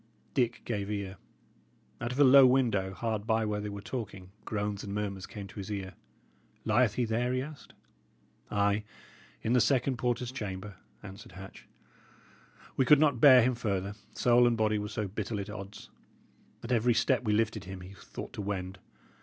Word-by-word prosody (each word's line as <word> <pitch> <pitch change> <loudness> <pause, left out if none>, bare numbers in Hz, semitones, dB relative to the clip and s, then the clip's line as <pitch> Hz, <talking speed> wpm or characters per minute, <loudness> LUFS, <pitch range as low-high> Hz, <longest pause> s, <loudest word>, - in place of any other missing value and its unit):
Dick 120 -3 0
gave 100 -4 -3
ear. 100 -2 -4 0.8
Out 120 0 -2
of 125 - -5
a - - +8
low 135 0 +8
window, 115 -7 +2
hard 110 0 -3
by 110 -1 +2
where 105 -1 -2
they 105 - -4
were 100 0 -6
talking, 100 -6 -6
groans 105 -1 -3
and 100 0 -5
murmurs 100 -3 -3
came 105 -2 -8
to 100 +1 -10
his 100 +1 -6
ear. 95 -2 -4 0.7
"Lieth 110 -1 +3
he 125 - +1
there?" 115 +2 0
he 130 0 0
asked. 150 0 -11 0.7
"Ay, 100 0 +1 0.6
in 115 - +1
the 125 - +5
second 130 0 +2
porter's 125 0 -1
chamber," 100 -5 -6 0.3
answered 95 -2 -11
Hatch. 95 +1 -11 1.1
"We 135 - +3
could 150 +3 +6
not 145 -6 +3
bear 130 -4 +9
him 130 +2 +2
further, 100 -4 -2 0.2
soul 120 0 +5
and 120 -1 +1
body 110 -1 +2
were 105 - -3
so 105 -1 -3
bitterly 105 +1 -3
at 100 - -9
odds. 100 0 -9 0.7
At 115 - -5
every 120 0 +3
step 130 0 +2
we 105 -3 +1
lifted 110 -1 0
him, 95 0 -8
he 90 +2 -10
thought 95 - -9
to - - -5
wend. 95 -1 -4
105 Hz, 180 wpm, -30 LUFS, 100-120 Hz, 1.1 s, bear